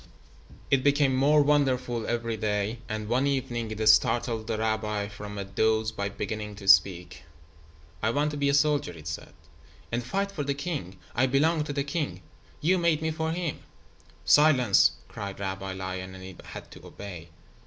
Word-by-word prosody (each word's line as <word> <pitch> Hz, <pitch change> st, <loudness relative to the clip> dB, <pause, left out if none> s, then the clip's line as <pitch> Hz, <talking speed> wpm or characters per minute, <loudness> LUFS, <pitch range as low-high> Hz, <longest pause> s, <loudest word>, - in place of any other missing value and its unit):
It 135 Hz, -1 st, +3 dB
became 140 Hz, -2 st, +3 dB
more 145 Hz, +3 st, +4 dB
wonderful 130 Hz, -5 st, +1 dB
every 115 Hz, -1 st, -1 dB
day, 105 Hz, +1 st, -1 dB
and 110 Hz, -1 st, -3 dB
one 125 Hz, +5 st, +1 dB
evening 120 Hz, -4 st, -2 dB
it 110 Hz, 0 st, -2 dB
startled 110 Hz, +1 st, +3 dB
the 115 Hz, -2 st, -1 dB
rabbi 110 Hz, -2 st, -1 dB
from 105 Hz, 0 st, -8 dB
a 100 Hz, -, -3 dB
doze 110 Hz, +3 st, +1 dB
by 100 Hz, -2 st, -3 dB
beginning 105 Hz, +1 st, -5 dB
to 100 Hz, -1 st, -10 dB
speak. 90 Hz, -1 st, +4 dB, 0.8 s
"I 110 Hz, -, +1 dB
want 145 Hz, +5 st, +1 dB
to 145 Hz, -, -5 dB
be 140 Hz, 0 st, +1 dB
a 140 Hz, -, +3 dB
soldier," 145 Hz, -, +2 dB
it 80 Hz, -3 st, -13 dB
said, 80 Hz, -, -6 dB, 0.6 s
"and 120 Hz, +1 st, -1 dB
fight 195 Hz, +10 st, -2 dB
for 175 Hz, -, -4 dB
the 140 Hz, 0 st, -1 dB
king. 140 Hz, -, -4 dB, 0.2 s
I 130 Hz, +3 st, +2 dB
belong 150 Hz, +4 st, +2 dB
to 145 Hz, -, -4 dB
the 140 Hz, -1 st, -1 dB
king. 140 Hz, -, -3 dB, 0.4 s
You 180 Hz, +4 st, +3 dB
made 165 Hz, -2 st, +2 dB
me 160 Hz, -, 0 dB
for 160 Hz, 0 st, -2 dB
him." 170 Hz, -2 st, -3 dB, 0.7 s
"Silence," 130 Hz, -9 st, +5 dB
cried 100 Hz, -1 st, -7 dB
Rabbi 95 Hz, -1 st, -4 dB
Lion, 95 Hz, 0 st, -5 dB
and 95 Hz, -, -10 dB
it 95 Hz, -1 st, -10 dB
had -, -, -9 dB
to -, -, -13 dB
obey. 90 Hz, -5 st, -9 dB
115 Hz, 175 wpm, -27 LUFS, 100-145 Hz, 0.8 s, Silence